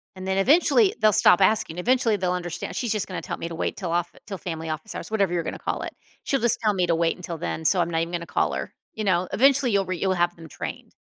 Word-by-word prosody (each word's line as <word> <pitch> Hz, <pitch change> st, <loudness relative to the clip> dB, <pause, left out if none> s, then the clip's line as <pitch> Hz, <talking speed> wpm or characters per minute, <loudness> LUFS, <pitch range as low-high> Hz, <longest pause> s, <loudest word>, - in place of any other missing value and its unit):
And 185 Hz, 0 st, -7 dB
then 190 Hz, 0 st, 0 dB
eventually, 350 Hz, -, +4 dB
they'll 215 Hz, -, +5 dB
stop 195 Hz, -1 st, +5 dB
asking, 190 Hz, -4 st, +2 dB
eventually 235 Hz, +1 st, +2 dB
they'll 180 Hz, -1 st, 0 dB
understand, 175 Hz, -1 st, -5 dB
"She's 240 Hz, -4 st, -1 dB
just 215 Hz, -3 st, -1 dB
gonna 185 Hz, -, -5 dB
tell -, -, -5 dB
me 165 Hz, -, -5 dB
to 170 Hz, -, -7 dB
wait -, -, -3 dB
till 180 Hz, -4 st, -4 dB
off 175 Hz, 0 st, -1 dB
till 195 Hz, -, -5 dB
family 160 Hz, -3 st, -5 dB
office 155 Hz, 0 st, -5 dB
hours," -, -, -7 dB
whatever 200 Hz, -5 st, +1 dB
you're 170 Hz, -1 st, 0 dB
gonna -, -, -5 dB
call -, -, -3 dB
it, -, -, -6 dB, 0.3 s
"She'll 275 Hz, -, 0 dB
just 235 Hz, -1 st, +2 dB
tell 210 Hz, -1 st, +3 dB
me 185 Hz, -2 st, +1 dB
to 170 Hz, -, +2 dB
wait 165 Hz, 0 st, +1 dB
until 175 Hz, -2 st, -6 dB
then, 160 Hz, 0 st, -4 dB
so, 180 Hz, +2 st, +5 dB
I'm 170 Hz, -, -1 dB
not 165 Hz, -1 st, 0 dB
even 165 Hz, +1 st, -3 dB
gonna 170 Hz, -1 st, -3 dB
call -, -, 0 dB
her," -, -, -5 dB, 0.2 s
you 220 Hz, -, -4 dB
know? 185 Hz, -2 st, +1 dB
Eventually, 270 Hz, 0 st, +4 dB
you'll 200 Hz, -1 st, +2 dB
re 185 Hz, -1 st, -3 dB
you'll 190 Hz, +2 st, +1 dB
have 175 Hz, -1 st, 0 dB
them 165 Hz, -1 st, -12 dB
trained. 80 Hz, -, -7 dB
185 Hz, 275 wpm, -24 LUFS, 170-215 Hz, 0.3 s, they'll